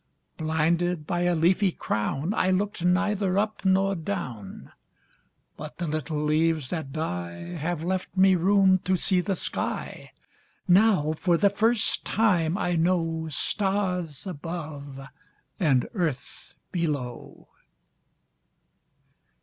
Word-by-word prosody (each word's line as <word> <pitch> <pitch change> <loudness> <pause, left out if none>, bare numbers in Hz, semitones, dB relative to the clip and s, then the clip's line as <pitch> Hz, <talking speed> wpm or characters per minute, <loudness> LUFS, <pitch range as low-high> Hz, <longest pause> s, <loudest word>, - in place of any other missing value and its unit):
Blinded 160 +1 0
by 175 +2 -1
a 175 -1 +2
leafy 180 +4 +3
crownI 160 - -1
looked 205 -2 -3
neither 195 +1 +1
up 215 +1 -1
nor 195 +1 +3
down—But 155 - -9
the 175 - -3
little 155 -1 -2
leaves 155 -2 +1
that 160 -6 -4
dieHave 155 - -4
left 185 +1 -3
me 190 0 +6
room 190 +1 +4
to 185 +1 0
see 185 +1 +2
the 195 +1 -1
sky; - - -4 0.6
Now 185 -5 +4
for 175 -2 +2
the 200 +3 +3
first 220 +2 +2
time 180 -6 +1
I 175 -4 0
knowStars 170 +1 -1
above 155 -5 -6 0.6
and 140 -9 +2
earth 165 - -4 0.2
below. 150 -8 -4
175 Hz, 100 wpm, -26 LUFS, 155-190 Hz, 0.6 s, me